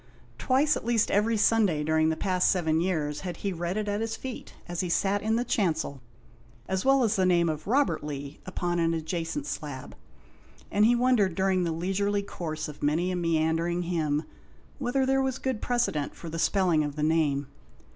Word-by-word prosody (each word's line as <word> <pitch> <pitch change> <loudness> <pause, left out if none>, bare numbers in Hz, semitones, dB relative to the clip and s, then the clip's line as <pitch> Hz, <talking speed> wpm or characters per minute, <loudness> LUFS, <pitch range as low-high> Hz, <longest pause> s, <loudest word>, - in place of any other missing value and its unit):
Twice 285 +4 +3
at - - -5
least 230 -1 +1
every 215 +2 +2
Sunday 205 -8 +3
during 160 +1 +2
the 160 - 0
past 185 +1 +1
seven 160 -4 +2
years 155 -5 -1
had 180 -3 -5
he 195 - 0
read 175 +3 -3
it 210 -1 -2
at 205 +1 -1
his 225 0 -2
feet, 255 +1 -8
as 175 -1 -5
he 180 - -1
sat 200 +3 +1
in 220 +1 +1
the 240 - +1
chancel, 160 - -1 0.7
as 190 0 -1
well 270 -1 +4
as 220 -1 +2
the 190 - +2
name 170 -2 +3
of 155 0 -3
Robert 270 - +2
Lee 145 -1 -6
upon 175 -1 -1
an 165 0 +2
adjacent 165 - -3
slab, 145 - -6 0.8
and 210 +1 +4
he 235 - +5
had 240 - +1
wondered 235 -8 +3
during 190 -2 +1
the 170 - -1
leisurely 195 +4 -1
course 160 -5 -5
of 150 - -10
many 160 +5 +1
a - - -1
meandering 165 +1 0
hymn 155 -3 0 0.6
whether 265 0 +1
there 270 0 +2
was 265 -1 -1
good 260 -5 -3
precedent 240 -13 -1
for 170 - -8
the 165 +1 -5
spelling 175 -4 +2
of 145 -1 -4
the 150 - -2
name. 150 -3 +2
180 Hz, 195 wpm, -27 LUFS, 160-215 Hz, 0.8 s, he